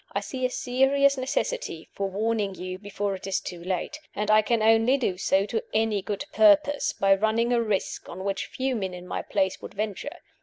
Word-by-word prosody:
I -, -, +1 dB
see 255 Hz, -1 st, -2 dB
a -, -, -11 dB
serious 270 Hz, +3 st, +2 dB
necessity 265 Hz, -, -2 dB
for 195 Hz, -1 st, -2 dB
warning 205 Hz, 0 st, -1 dB
you 185 Hz, 0 st, -6 dB
before 205 Hz, 0 st, -3 dB
it 190 Hz, -, -7 dB
is 195 Hz, -, 0 dB
too 175 Hz, -2 st, -8 dB
late; 185 Hz, -, -3 dB, 0.2 s
and 210 Hz, +1 st, 0 dB
I 215 Hz, 0 st, +7 dB
can 225 Hz, 0 st, +1 dB
only 225 Hz, +4 st, +5 dB
do 235 Hz, -8 st, -1 dB
so 195 Hz, 0 st, +2 dB
to 220 Hz, +2 st, -2 dB
any 220 Hz, -2 st, +2 dB
good 205 Hz, +7 st, -4 dB
purpose 300 Hz, -1 st, +4 dB
by 195 Hz, 0 st, +4 dB
running 220 Hz, +4 st, +1 dB
a 235 Hz, -, +3 dB
risk 210 Hz, -4 st, -2 dB
on 185 Hz, +2 st, -7 dB
which 195 Hz, 0 st, -2 dB
few 260 Hz, 0 st, -2 dB
men 190 Hz, -4 st, -3 dB
in 180 Hz, 0 st, -9 dB
my -, -, -3 dB
place 190 Hz, -2 st, -1 dB
would -, -, -9 dB
venture. 215 Hz, +7 st, -4 dB
215 Hz, 205 wpm, -26 LUFS, 195-255 Hz, 0.2 s, I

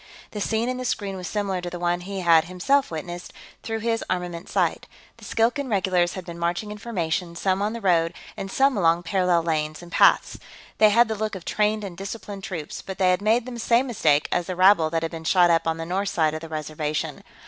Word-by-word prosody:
The 210 Hz, -, -5 dB
scene 225 Hz, +3 st, 0 dB
in 255 Hz, 0 st, -2 dB
the 255 Hz, -, -4 dB
screen 205 Hz, -5 st, -2 dB
was 180 Hz, -1 st, -6 dB
similar 200 Hz, -3 st, -2 dB
to 175 Hz, -, -4 dB
the 175 Hz, -, -6 dB
one 175 Hz, 0 st, 0 dB
he 195 Hz, +1 st, -5 dB
had, 165 Hz, -2 st, +5 dB
himself, 225 Hz, +11 st, +1 dB
witnessed 175 Hz, +2 st, -6 dB, 0.3 s
through 225 Hz, 0 st, -4 dB
his 230 Hz, 0 st, 0 dB
armament 180 Hz, -2 st, -3 dB
sight. -, -, 0 dB, 0.3 s
The -, -, -13 dB
Skilkan 250 Hz, +5 st, 0 dB
regulars 185 Hz, -4 st, +1 dB
had 185 Hz, -2 st, -7 dB
been 170 Hz, -1 st, -8 dB
marching 175 Hz, +5 st, -2 dB
in 210 Hz, -, -8 dB
formation, 180 Hz, -5 st, -2 dB
some 190 Hz, +2 st, 0 dB
on 210 Hz, +2 st, 0 dB
the 235 Hz, -, -6 dB
road 170 Hz, -3 st, +2 dB, 0.2 s
and 195 Hz, -, -6 dB
some 270 Hz, +3 st, +3 dB
along 170 Hz, -2 st, +2 dB
parallel 180 Hz, -1 st, +2 dB
lanes 155 Hz, -1 st, -2 dB
and 175 Hz, -, -12 dB
paths. -, -, +4 dB, 0.4 s
They 215 Hz, -, +7 dB
had 235 Hz, +3 st, +5 dB
the 220 Hz, -, -2 dB
look 215 Hz, -1 st, -3 dB
of 185 Hz, -, -9 dB
trained 215 Hz, 0 st, 0 dB
and 190 Hz, -3 st, -6 dB
disciplined 195 Hz, +1 st, -7 dB
troops, 165 Hz, -6 st, -5 dB
but 190 Hz, -1 st, -7 dB
they 185 Hz, -1 st, +3 dB
had 180 Hz, -, +1 dB
made 225 Hz, +3 st, +2 dB
the 245 Hz, -2 st, -7 dB
same 235 Hz, +3 st, +3 dB
mistake 155 Hz, -, +2 dB
as 175 Hz, -1 st, 0 dB
the 185 Hz, -, -3 dB
rabble 185 Hz, -3 st, +5 dB
that 165 Hz, 0 st, -1 dB
had 165 Hz, -, -2 dB
been 165 Hz, -1 st, -7 dB
shot 175 Hz, +1 st, +4 dB
up 165 Hz, 0 st, +2 dB
on 165 Hz, 0 st, 0 dB
the 165 Hz, -, -5 dB
north 190 Hz, +3 st, -1 dB
side 155 Hz, -2 st, +1 dB
of 155 Hz, -, -5 dB
the 165 Hz, -, -8 dB
Reservation. 155 Hz, -1 st, -3 dB
185 Hz, 235 wpm, -24 LUFS, 170-210 Hz, 0.4 s, They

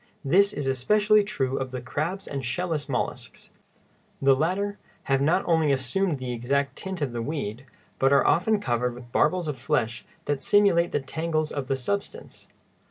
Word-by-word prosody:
This 195 Hz, +8 st, +4 dB
is 145 Hz, -, -4 dB
especially 210 Hz, +11 st, +3 dB
true 135 Hz, -10 st, -2 dB
of 130 Hz, -1 st, -3 dB
the 130 Hz, 0 st, -5 dB
crabs 155 Hz, +10 st, -3 dB
and 135 Hz, -1 st, -4 dB
shell 175 Hz, +10 st, -2 dB
less 150 Hz, -3 st, -2 dB
mollusks. 125 Hz, -, -4 dB, 0.7 s
The 135 Hz, -1 st, +5 dB
latter 190 Hz, +8 st, -1 dB, 0.2 s
have 135 Hz, 0 st, +1 dB
not 170 Hz, +7 st, +2 dB
only 160 Hz, -4 st, +3 dB
assumed 140 Hz, +6 st, 0 dB
the 130 Hz, -1 st, -5 dB
exact 140 Hz, +4 st, -1 dB
tint 190 Hz, -4 st, -4 dB
of 135 Hz, -, -2 dB
the 120 Hz, 0 st, -3 dB
weed, 135 Hz, -2 st, -4 dB, 0.3 s
but 135 Hz, +1 st, +3 dB
are 140 Hz, -, +5 dB
often 210 Hz, +5 st, +3 dB
covered 125 Hz, -, -1 dB
with 120 Hz, -1 st, -12 dB
barbels 170 Hz, +5 st, +2 dB
of 145 Hz, -4 st, -4 dB
flesh 120 Hz, -4 st, -1 dB, 0.2 s
that 145 Hz, -2 st, -1 dB
simulate 180 Hz, 0 st, +4 dB
the -, -, 0 dB
tangles 155 Hz, +3 st, -2 dB
of 140 Hz, -3 st, -4 dB
the 135 Hz, -, +1 dB
substance. 200 Hz, -, -5 dB
145 Hz, 175 wpm, -26 LUFS, 130-180 Hz, 0.7 s, The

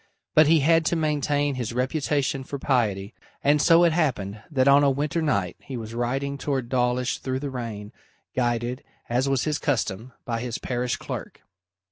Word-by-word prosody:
But 155 Hz, -1 st, +6 dB
he 160 Hz, -1 st, +5 dB
had 165 Hz, +3 st, +4 dB
to 170 Hz, -, +1 dB
maintain 145 Hz, -2 st, 0 dB
his 120 Hz, -3 st, -4 dB
reputation 135 Hz, +1 st, 0 dB
for 140 Hz, -, -5 dB
piety, 110 Hz, -7 st, 0 dB, 0.3 s
and 145 Hz, +1 st, +4 dB
so 165 Hz, +2 st, +6 dB
it 170 Hz, -2 st, +4 dB
happened 110 Hz, -, -1 dB
that 135 Hz, -4 st, +2 dB
on 140 Hz, +1 st, +6 dB
a 140 Hz, -, +5 dB
winter 145 Hz, +4 st, -1 dB
night 100 Hz, -, 0 dB
he 130 Hz, -, -7 dB
was 115 Hz, -1 st, -7 dB
riding 135 Hz, +4 st, -2 dB
towards 135 Hz, -5 st, -2 dB
Dawlish 125 Hz, 0 st, 0 dB
through 130 Hz, -1 st, -2 dB
the 140 Hz, -2 st, -4 dB
rain, 110 Hz, -5 st, -6 dB, 0.4 s
guided, 120 Hz, +1 st, -1 dB, 0.3 s
as 125 Hz, +3 st, +1 dB
was 135 Hz, -2 st, +1 dB
his 150 Hz, -1 st, -1 dB
custom, 120 Hz, -4 st, -2 dB
by 115 Hz, -3 st, -2 dB
his 120 Hz, -1 st, -3 dB
parish 125 Hz, 0 st, -2 dB
clerk. -, -, -7 dB
130 Hz, 175 wpm, -25 LUFS, 120-145 Hz, 0.4 s, But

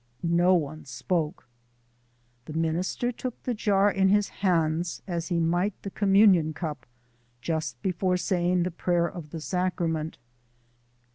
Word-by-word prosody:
No 175 Hz, +2 st, +4 dB
one 155 Hz, -2 st, -3 dB
spoke. 155 Hz, +6 st, -2 dB, 1.0 s
The 155 Hz, -, -8 dB
minister 165 Hz, +9 st, -1 dB
took 250 Hz, 0 st, -6 dB
the 250 Hz, -, -1 dB
jar 205 Hz, -2 st, +2 dB
in 190 Hz, -1 st, +2 dB
his 205 Hz, +1 st, +3 dB
hands 170 Hz, -2 st, 0 dB
as 170 Hz, -3 st, -3 dB
he 175 Hz, -2 st, 0 dB
might 175 Hz, +4 st, 0 dB
the 195 Hz, -, -5 dB
communion 195 Hz, -6 st, +4 dB
cup 150 Hz, -7 st, -5 dB, 0.5 s
just 160 Hz, +5 st, -3 dB
before 185 Hz, -1 st, +1 dB
saying 180 Hz, -1 st, +1 dB
the 180 Hz, -, -2 dB
prayer 175 Hz, 0 st, +1 dB
of 170 Hz, -3 st, -8 dB
the 165 Hz, -, -6 dB
sacrament. 165 Hz, -2 st, -2 dB
175 Hz, 135 wpm, -27 LUFS, 160-190 Hz, 1.0 s, No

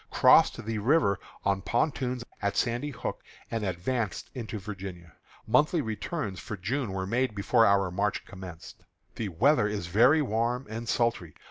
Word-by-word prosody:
crossed 120 Hz, -, +5 dB
the 110 Hz, -1 st, -2 dB
river 115 Hz, -3 st, +3 dB, 0.3 s
on 100 Hz, -1 st, +1 dB
pontoons 125 Hz, 0 st, -1 dB, 0.2 s
at 100 Hz, 0 st, -1 dB
Sandy 120 Hz, +4 st, 0 dB
Hook, 140 Hz, -, -5 dB, 0.3 s
and 115 Hz, -2 st, -2 dB
advanced 100 Hz, +3 st, -2 dB
into 115 Hz, -4 st, -5 dB
Virginia. 95 Hz, -5 st, -8 dB, 0.3 s
Monthly 150 Hz, +8 st, +3 dB
returns 110 Hz, -, -3 dB
for 105 Hz, -, -6 dB
June 115 Hz, +4 st, -2 dB
were 95 Hz, 0 st, -3 dB
made 120 Hz, +2 st, 0 dB
before 115 Hz, +3 st, +4 dB
our 100 Hz, -2 st, +3 dB
march 100 Hz, +2 st, -1 dB
commenced. 90 Hz, -4 st, -10 dB, 0.3 s
The 110 Hz, -3 st, -3 dB
weather 115 Hz, -, +3 dB
is 105 Hz, -3 st, -3 dB
very 125 Hz, -, +4 dB
warm 120 Hz, +2 st, -1 dB
and 115 Hz, +2 st, -6 dB
sultry. 115 Hz, -9 st, 0 dB
110 Hz, 150 wpm, -28 LUFS, 100-125 Hz, 0.3 s, crossed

